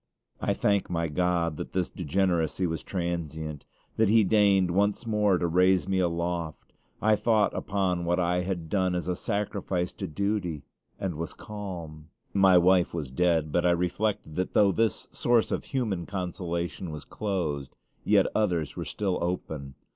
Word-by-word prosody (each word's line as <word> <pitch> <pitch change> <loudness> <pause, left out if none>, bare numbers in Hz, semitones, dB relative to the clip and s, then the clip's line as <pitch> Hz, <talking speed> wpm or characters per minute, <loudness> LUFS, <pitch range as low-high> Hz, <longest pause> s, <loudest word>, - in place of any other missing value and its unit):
I - - +1
thank 100 -1 +1
my 85 -1 -1
God 85 -1 0
that - - -6
this 90 -2 +1
degeneracy 90 0 0
was 80 -1 -2
transient 80 -4 -4 0.3
that 110 -2 +3
He 110 +1 +6
deigned 100 -3 +4
once 100 +5 +1
more 105 -4 +2
to 85 - -1
raise 90 0 +3
me 95 -1 +1
aloft. 85 -2 -2 0.3
I 110 0 +5
thought 110 -2 +2
upon 95 -3 -1
what 90 +1 +1
I 90 0 +1
had 90 -3 -3
done 95 -1 +1
as 90 0 -3
a 90 - 0
sacrifice 95 -3 -2
to - - -5
duty, 90 -2 -2 0.4
and 95 -3 -2
was 80 +2 -5
calm. 85 -7 -8 0.2
My 95 -2 +6
wife 90 0 +4
was 75 -6 -4
dead; 80 0 +1
but 85 - +2
I 90 - +4
reflected 90 0 -1
that 90 - -2
though 100 -2 +5
this 110 0 0
source 120 -2 +2
of - - -2
human 110 - -2
consolation 90 -2 -3
was 75 -2 -7
closed, 80 -10 -3 0.3
yet - - +4
others 90 -8 0
were - - -4
still 95 -3 -1
open. 80 -6 -4
90 Hz, 160 wpm, -27 LUFS, 85-100 Hz, 0.4 s, He